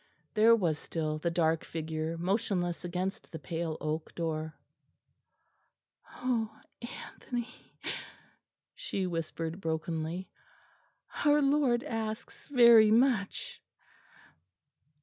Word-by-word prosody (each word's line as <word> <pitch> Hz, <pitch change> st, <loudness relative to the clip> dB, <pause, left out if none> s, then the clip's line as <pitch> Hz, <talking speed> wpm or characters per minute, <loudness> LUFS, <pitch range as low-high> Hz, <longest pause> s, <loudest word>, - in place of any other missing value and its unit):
There 225 Hz, +1 st, +7 dB
was 170 Hz, -8 st, 0 dB
still 155 Hz, -2 st, -2 dB
the 170 Hz, -, 0 dB
dark 165 Hz, -1 st, +2 dB
figure 160 Hz, 0 st, -3 dB
motionless 180 Hz, -1 st, 0 dB
against 180 Hz, +2 st, -3 dB
the 160 Hz, -, -5 dB
pale 160 Hz, +2 st, -3 dB
oak 155 Hz, +1 st, -3 dB
door. 160 Hz, -2 st, -3 dB, 1.6 s
"Oh, 235 Hz, -3 st, -1 dB, 0.2 s
Anthony!" 240 Hz, 0 st, -6 dB, 1.2 s
she 200 Hz, -, -3 dB
whispered 165 Hz, 0 st, -3 dB
brokenly, 160 Hz, +2 st, -2 dB, 1.0 s
"our 295 Hz, 0 st, +5 dB
Lord 275 Hz, -4 st, +3 dB
asks 225 Hz, -5 st, -5 dB
very 235 Hz, -5 st, +8 dB
much." 225 Hz, -3 st, +2 dB
180 Hz, 90 wpm, -31 LUFS, 160-230 Hz, 1.6 s, very